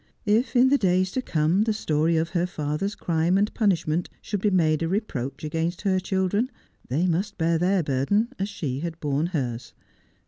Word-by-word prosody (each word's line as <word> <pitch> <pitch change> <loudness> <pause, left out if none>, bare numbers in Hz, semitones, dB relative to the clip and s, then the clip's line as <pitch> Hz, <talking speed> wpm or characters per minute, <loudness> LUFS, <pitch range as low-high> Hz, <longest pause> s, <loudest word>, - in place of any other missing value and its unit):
If 220 +6 +1
in 250 +1 +6
the 280 +1 +3
days 185 -1 +2
to 260 - -1
come 165 -2 +1
the 220 0 +2
story 165 -5 +1
of 160 +1 0
her 175 -1 0
father's 155 +5 -3
crime 170 +2 +1
and 205 +2 +1
punishment 175 -5 +1
should 205 -2 -4
be 210 - +3
made 160 -5 +2
a 165 - 0
re 195 +5 +2
proach 135 - -6
against 165 +4 -2
her 190 -2 +2
children, 190 +5 0 0.4
they 150 +8 +1
must 185 +4 -1
bear 165 0 +1
their 185 +1 +2
burden 145 - +1
as 195 +1 -1
she 140 -10 -4
had 165 +1 -5
borne 145 +2 0
hers. 125 -8 -4
175 Hz, 195 wpm, -25 LUFS, 155-200 Hz, 0.4 s, in